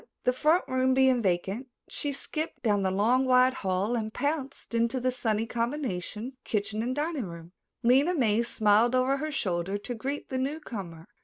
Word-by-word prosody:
The 250 - +3
front 310 +7 +3
room 260 0 +2
being 260 -2 +4
vacant, 195 +6 -1 0.2
she 290 - -3
skipped 310 +3 -5
down 205 -4 +2
the 190 - +1
long, 220 +7 +3
wide 255 0 +5
hall 195 +1 -1
and 220 -2 -2
pounced 280 -1 -3
into 235 +2 +1
the 255 +1 +1
sunny 225 -3 -1
combination 235 - -3
kitchen 210 0 -2
and 250 +3 -2
dining 295 -4 -2
room. 170 -1 -9 0.3
Lena 270 +9 +4
May 230 -6 +3
smiled 230 +1 +3
over 255 +2 +2
her 310 +3 -3
shoulder 190 - -1
to 225 +4 -6
greet 270 +5 -4
the 260 - -2
newcomer. 220 - -5
245 Hz, 170 wpm, -28 LUFS, 210-265 Hz, 0.3 s, wide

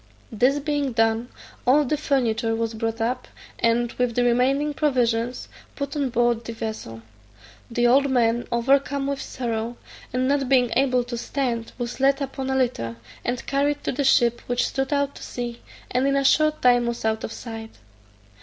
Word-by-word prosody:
This 250 +6 +3
being 290 -2 -1
done, 225 +1 +1 0.3
all 285 +4 +4
the 290 - +1
furniture 240 -6 0
was 225 0 -2
brought 225 0 -3
up, 245 +3 -1 0.3
and, 235 0 +2
with 245 -2 -1
the 245 - +3
remaining 265 +5 +2
provisions, 245 -5 0 0.3
put 280 +1 -4
on 280 -3 0
board 240 -1 +1
the 230 - -6
vessel. 215 - -6 0.7
The 240 0 +1
old 275 +3 +4
man, 240 -2 +2
overcome 275 +3 +2
with 280 0 -2
sorrow, 235 -1 -3 0.3
and 255 +1 0
not 275 -2 +1
being 250 -3 +4
able 255 -1 +3
to 240 -1 -5
stand, 240 -3 -2
was 240 0 -4
laid 275 +1 +3
upon 270 -1 -4
a 265 - 0
litter, 240 - 0 0.3
and 245 0 -2
carried 285 +1 0
to - - -1
the 280 +2 -1
ship, 240 -3 +3
which 245 0 +1
stood 270 +1 -2
out 280 -1 +1
to - - -12
sea, 240 -1 -5 0.3
and 255 +2 +2
in 275 - +2
a 275 0 +1
short 310 +2 +3
time 245 -1 +5
was 235 -1 -3
out 220 0 0
of - - -4
sight. 225 -2 -8
245 Hz, 180 wpm, -24 LUFS, 235-275 Hz, 0.7 s, time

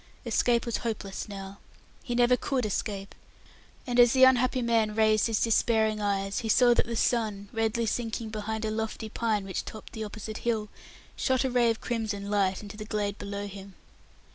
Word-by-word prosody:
Escape 235 -1 +2
was 235 - -1
hopeless 215 -4 -4
now. 195 0 -8 0.4
He 240 - -4
never 245 +1 +5
could 255 -1 -1
escape; 200 -1 -3 0.7
and 245 -2 0
as 240 -1 +7
the 260 -1 +5
unhappy 255 0 +4
man 225 -2 +1
raised 215 0 +3
his 225 -2 0
despairing 220 -1 +2
eyes, 195 -1 -1
he 225 - -4
saw 245 +2 +6
that - - +1
the 235 - -3
sun, 215 -4 0
redly 225 0 0
sinking 225 0 -2
behind 220 +1 -3
a 215 - -1
lofty 220 0 -3
pine 215 -2 -1
which 190 -2 -3
topped 215 - -10
the 220 - -4
opposite 215 +1 -6
hill, 220 -3 -1 0.5
shot 260 -1 +1
a 265 - -1
ray 240 -1 +3
of 225 - -1
crimson 215 -4 -3
light 195 -1 +1
into 205 0 -9
the 215 - -6
glade 205 -2 -2
below 200 0 -4
him. 195 -1 -10
220 Hz, 185 wpm, -28 LUFS, 205-235 Hz, 0.7 s, as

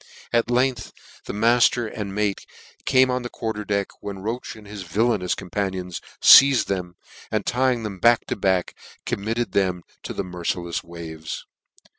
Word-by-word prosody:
At 115 0 +3
k. 120 - -1
gth 125 -2 0 0.3
the - - -4
mite' 115 +4 +4
and 105 -4 -4
mate 105 -2 -1 0.4
came 130 -1 +4
on 125 0 -1
the 120 - -5
quarter 110 -3 -4
deck, 100 -1 -1
when 100 -1 -6
Roche 110 +6 -5
and 110 -1 -14
his 100 0 -8
villainous 95 +1 0
companions 95 -1 -4 0.2
feized 135 -2 +8
them, 90 -2 -3 0.3
and 110 -2 -1
ty; 130 +2 +2
ng 120 -2 -5
them 100 -3 -5
ack 120 0 +5
to - - -2
back, 95 -3 0 0.3
committed 115 +4 -2
them 90 -3 0 0.2
to - - -6
the - - -2
mer 90 -1 -8
cikfs 85 0 -2
waves. 80 -2 -7
105 Hz, 170 wpm, -23 LUFS, 90-120 Hz, 0.4 s, feized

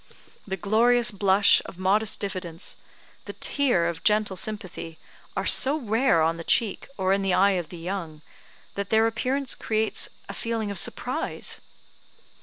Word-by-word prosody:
The 190 -1 -3
glorious 235 +5 +3
blush 200 0 +4
of - - -11
modest 195 +3 +1
diffidence, 185 -4 -4 0.5
the - - -7
tear 250 - +1
of 170 -1 -5
gentle 210 -2 +1
sympathy, 185 -6 -5 0.4
are - - -1
so 275 +3 +7
rare 225 - +2
on 165 +1 0
the 165 - -7
cheek, 215 +4 0
or 190 -1 +1
in 195 - 0
the 195 -2 +1
eye 200 +2 +4
of 165 - -15
the 175 - -9
young, 165 -3 -6 0.5
that 200 0 -4
their 220 0 +3
appearance 255 +4 -1
creates 220 0 -1 0.2
a - - -7
feeling 225 -3 -3
of 200 - -2
surprise. - - -3
200 Hz, 155 wpm, -25 LUFS, 185-225 Hz, 0.5 s, so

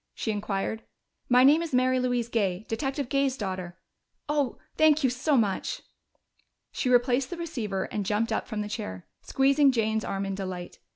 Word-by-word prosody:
she 220 - -2
inquired. 205 +1 -2 0.5
"My 250 0 +6
name 295 +5 +6
is 330 -6 -2
Mary 255 0 +3
Louise 245 -2 0
Gay 205 -4 -1
Detective 270 +4 -2
Gay's 275 -1 +1
daughter.... 185 -4 -5 0.5
Oh, 290 -4 0 0.2
thank 310 -1 +4
you 260 - +3
so 265 +3 +1
much!" 205 -5 -1 0.9
She 255 - -1
replaced 250 +1 +3
the 350 - -5
receiver 230 - -3
and 210 - -3
jumped 210 +3 0
up 220 - -1
from 215 -1 -3
the 210 - -3
chair, 95 - -6 0.2
squeezing 275 +1 +3
Jane's 220 -3 0
arm 195 0 -3
in 195 - -3
delight. 185 -2 -6
240 Hz, 170 wpm, -27 LUFS, 205-270 Hz, 0.9 s, My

